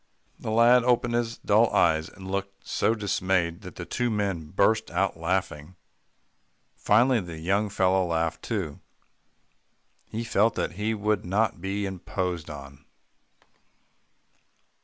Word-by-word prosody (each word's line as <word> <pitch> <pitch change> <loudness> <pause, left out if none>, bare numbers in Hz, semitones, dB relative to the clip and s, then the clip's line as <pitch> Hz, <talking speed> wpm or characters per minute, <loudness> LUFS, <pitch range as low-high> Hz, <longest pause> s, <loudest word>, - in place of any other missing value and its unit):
The - - -5
lad 120 +2 +5
opened 120 -1 +2
his 120 0 -1
dull - - +3
eyes, 80 0 +2
and 95 0 -10
looked 100 0 -4
so 115 - +1
dismayed, 95 -4 0
that 90 -2 -10
the 85 - -6
two 120 +5 -1
men 100 -7 -2
burst 110 +5 +2
out 95 -1 0
laughing. 85 -1 -2 1.0
Finally 120 +4 +3
the 85 -3 -8
young 100 +6 0
fellow 95 -1 +2
laughed 80 -1 -1
too. 95 -11 -3 1.3
He 115 +2 -4
felt 115 -1 +2
that - - -1
he 105 +5 -2
would 105 -1 0
not 100 0 0
be 100 +2 -2
imposed 90 -3 -4
on. 70 -1 -10
95 Hz, 130 wpm, -26 LUFS, 85-110 Hz, 1.3 s, lad